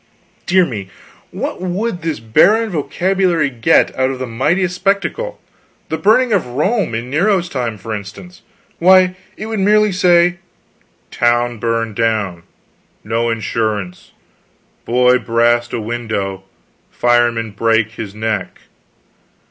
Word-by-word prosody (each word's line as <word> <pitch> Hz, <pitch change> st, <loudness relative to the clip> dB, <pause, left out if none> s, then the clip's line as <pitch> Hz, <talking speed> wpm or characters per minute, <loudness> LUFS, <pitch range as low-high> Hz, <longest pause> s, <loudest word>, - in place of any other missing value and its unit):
Dear 185 Hz, 0 st, +4 dB
me, 105 Hz, -, -6 dB, 0.4 s
what -, -, -5 dB
would 185 Hz, +1 st, -2 dB
this 160 Hz, -6 st, -3 dB
barren 195 Hz, -, +3 dB
vocabulary 175 Hz, 0 st, 0 dB
get 115 Hz, -2 st, +2 dB
out 130 Hz, 0 st, +1 dB
of 135 Hz, -, -4 dB
the 130 Hz, -, -4 dB
mightiest 170 Hz, +10 st, 0 dB
spectacle? 200 Hz, -, -1 dB, 0.5 s
the 160 Hz, -, -2 dB
burning 220 Hz, +6 st, +3 dB
of 195 Hz, -, +2 dB
Rome 185 Hz, -, -1 dB
in 120 Hz, +3 st, -5 dB
Nero's 180 Hz, +3 st, +1 dB
time, 120 Hz, -6 st, -3 dB
for 110 Hz, +2 st, -6 dB
instance? 105 Hz, -, -9 dB, 0.4 s
Why, 185 Hz, +1 st, +5 dB, 0.2 s
it 215 Hz, -, -6 dB
would 220 Hz, -1 st, -3 dB
merely 210 Hz, +1 st, +3 dB
say, 175 Hz, -1 st, +3 dB, 0.7 s
'Town 120 Hz, -1 st, +1 dB
burned 115 Hz, -1 st, -2 dB
down; 105 Hz, -6 st, -1 dB, 0.6 s
no 115 Hz, +2 st, -1 dB
insurance; 110 Hz, -4 st, -3 dB, 0.7 s
boy 125 Hz, +1 st, +3 dB
brast 120 Hz, +2 st, +1 dB
a -, -, -2 dB
window, 105 Hz, -4 st, -4 dB, 0.4 s
fireman 120 Hz, -2 st, +1 dB
brake 110 Hz, +1 st, +1 dB
his 105 Hz, -3 st, -8 dB
neck!' 110 Hz, -3 st, -3 dB
125 Hz, 125 wpm, -17 LUFS, 115-180 Hz, 0.7 s, Why